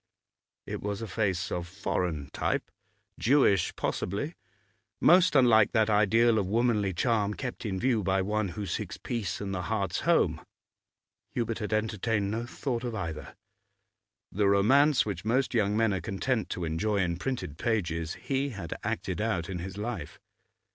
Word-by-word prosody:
It -, -, -5 dB
was 105 Hz, +1 st, -3 dB
a -, -, -4 dB
face 95 Hz, -3 st, -1 dB
of 90 Hz, -1 st, -3 dB
foreign 85 Hz, -6 st, -2 dB
type, -, -, -2 dB, 0.5 s
Jewish 120 Hz, -, +3 dB
possibly, 145 Hz, -, -2 dB, 0.7 s
most 180 Hz, -1 st, +5 dB
unlike 115 Hz, -5 st, +5 dB
that 110 Hz, -1 st, +3 dB
ideal 110 Hz, +2 st, +4 dB
of 95 Hz, -, -1 dB
womanly 110 Hz, -2 st, +2 dB
charm 105 Hz, +2 st, +1 dB
kept 125 Hz, -3 st, -5 dB
in 95 Hz, -2 st, -2 dB
view 120 Hz, -2 st, +2 dB
by 95 Hz, 0 st, +1 dB
one 105 Hz, +1 st, 0 dB
who 105 Hz, -, -3 dB
seeks 85 Hz, -, -4 dB
peace 110 Hz, -8 st, -3 dB
and 100 Hz, -1 st, -4 dB
the 90 Hz, -, -2 dB
heart's 95 Hz, 0 st, -1 dB
home. -, -, +2 dB, 0.9 s
Hubert 115 Hz, -2 st, -1 dB
had 105 Hz, -1 st, -4 dB
entertained 110 Hz, -1 st, 0 dB
no 115 Hz, +2 st, -3 dB
thought 125 Hz, -1 st, -3 dB
of 120 Hz, -2 st, -3 dB
either. 80 Hz, -6 st, -5 dB, 1.0 s
The 100 Hz, +1 st, +1 dB
romance 130 Hz, +9 st, +4 dB
which 105 Hz, -3 st, -4 dB
most 125 Hz, +6 st, +1 dB
young 105 Hz, -2 st, +2 dB
men 110 Hz, -2 st, +3 dB
are 95 Hz, -, -2 dB
content 110 Hz, +7 st, -1 dB
to 90 Hz, -, -3 dB
enjoy 95 Hz, +7 st, 0 dB
in 85 Hz, -3 st, 0 dB
printed 105 Hz, -, -4 dB
pages 85 Hz, -8 st, -1 dB
he 135 Hz, +1 st, -1 dB
had 95 Hz, -9 st, -6 dB
acted -, -, -2 dB
out 100 Hz, -7 st, -1 dB
in 90 Hz, -, -4 dB
his 95 Hz, +2 st, -6 dB
life. 105 Hz, -8 st, -5 dB
105 Hz, 160 wpm, -29 LUFS, 95-115 Hz, 1.0 s, most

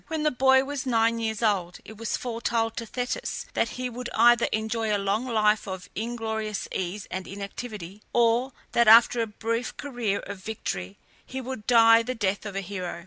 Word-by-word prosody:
When 320 Hz, -1 st, -2 dB
the 305 Hz, -, +3 dB
boy 265 Hz, +1 st, +4 dB
was 275 Hz, -1 st, -4 dB
nine 230 Hz, -1 st, +2 dB
years 220 Hz, 0 st, -2 dB
old 185 Hz, -5 st, +1 dB
it 220 Hz, -, -10 dB
was 230 Hz, +1 st, -2 dB
foretold 230 Hz, -1 st, -1 dB
to 230 Hz, -, -4 dB
Thetis 250 Hz, -, -3 dB
that -, -, +1 dB
he 255 Hz, 0 st, -2 dB
would 245 Hz, 0 st, -6 dB
either 235 Hz, +1 st, +5 dB
enjoy 220 Hz, 0 st, -1 dB
a 205 Hz, -, +3 dB
long 200 Hz, +5 st, -1 dB
life 215 Hz, -2 st, +2 dB
of 190 Hz, -1 st, -7 dB
inglorious 220 Hz, -1 st, -3 dB
ease 185 Hz, +2 st, -4 dB
and 185 Hz, 0 st, -4 dB
inactivity, 200 Hz, -1 st, -7 dB
or 240 Hz, +2 st, +3 dB, 0.2 s
that 235 Hz, -1 st, +3 dB
after 230 Hz, +2 st, +7 dB
a 225 Hz, -, -1 dB
brief 230 Hz, +3 st, -3 dB
career 240 Hz, -8 st, -2 dB
of 195 Hz, -, -8 dB
victory 100 Hz, -, -5 dB, 0.3 s
he 265 Hz, -, -6 dB
would 255 Hz, -4 st, -6 dB
die 230 Hz, -1 st, +7 dB
the 255 Hz, +2 st, -4 dB
death 205 Hz, -1 st, -1 dB
of 200 Hz, -, -7 dB
a 195 Hz, -, -1 dB
hero. 185 Hz, -3 st, -5 dB
225 Hz, 190 wpm, -26 LUFS, 205-240 Hz, 0.3 s, after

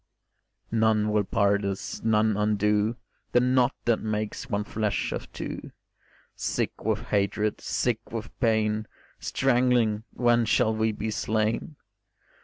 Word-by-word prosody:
None 110 Hz, -1 st, +2 dB
will 105 Hz, -1 st, +2 dB
part 100 Hz, 0 st, +2 dB
us, 100 Hz, -1 st, -4 dB
none 110 Hz, -1 st, +3 dB
undo 105 Hz, +1 st, +1 dB, 0.4 s
The 125 Hz, -, +6 dB
knot 125 Hz, +1 st, +3 dB
that 115 Hz, -2 st, +3 dB
makes 110 Hz, +3 st, -3 dB
one 105 Hz, -2 st, 0 dB
flesh 105 Hz, -1 st, -1 dB
of -, -, -5 dB
two, -, -, -6 dB, 0.6 s
Sick -, -, -2 dB
with -, -, 0 dB
hatred, 105 Hz, +1 st, 0 dB
sick 115 Hz, -2 st, -1 dB
with 115 Hz, -1 st, -5 dB
pain, 110 Hz, -2 st, +1 dB, 0.3 s
Strangling 120 Hz, -4 st, +2 dB
When 120 Hz, -1 st, +2 dB
shall 110 Hz, +1 st, +3 dB
we 110 Hz, 0 st, +1 dB
be 110 Hz, +1 st, -3 dB
slain? 110 Hz, +8 st, -1 dB
110 Hz, 125 wpm, -27 LUFS, 105-115 Hz, 0.6 s, The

